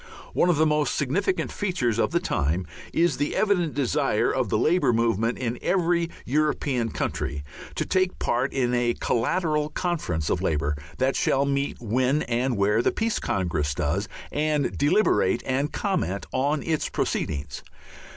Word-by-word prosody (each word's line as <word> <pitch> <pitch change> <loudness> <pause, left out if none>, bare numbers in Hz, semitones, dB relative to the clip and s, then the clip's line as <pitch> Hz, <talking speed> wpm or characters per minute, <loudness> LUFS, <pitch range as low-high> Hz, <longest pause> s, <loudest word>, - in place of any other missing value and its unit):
One 180 - +3
of 175 - +4
the 155 +1 +3
most 150 -1 +1
significant 160 - 0
features 130 - -1
of - - +2
the 170 - +1
time 85 - -1 0.3
is 165 -5 +2
the 145 - -1
evident 180 -7 +1
desire 135 -4 +1
of - - 0
the - - +2
Labour 175 -4 +3
movement 115 0 +1
in 120 -1 -3
every 175 -2 +1 0.2
European 140 -4 0
country 70 -8 -3 0.3
to - - -1
take 185 0 +1
part 125 +3 0
in 125 -2 0
a 120 -1 +1
collateral 150 +4 0
conference 150 - -2
of 90 - 0
Labour 75 -5 0 0.2
that 130 +1 +1
shall 135 +1 +2
meet 140 0 -1
when 130 +5 +1
and 120 0 0
where 105 +3 +3
the - - +2
Peace 225 0 -1
Congress 80 -7 -1
does 90 +10 -1 0.2
and 150 -1 0
deliberate 145 - +2
and 135 +3 0
comment 180 - -1
on 140 +3 +1
its 160 -2 -1
proceedings. 70 -2 -2
135 Hz, 155 wpm, -25 LUFS, 115-160 Hz, 0.3 s, of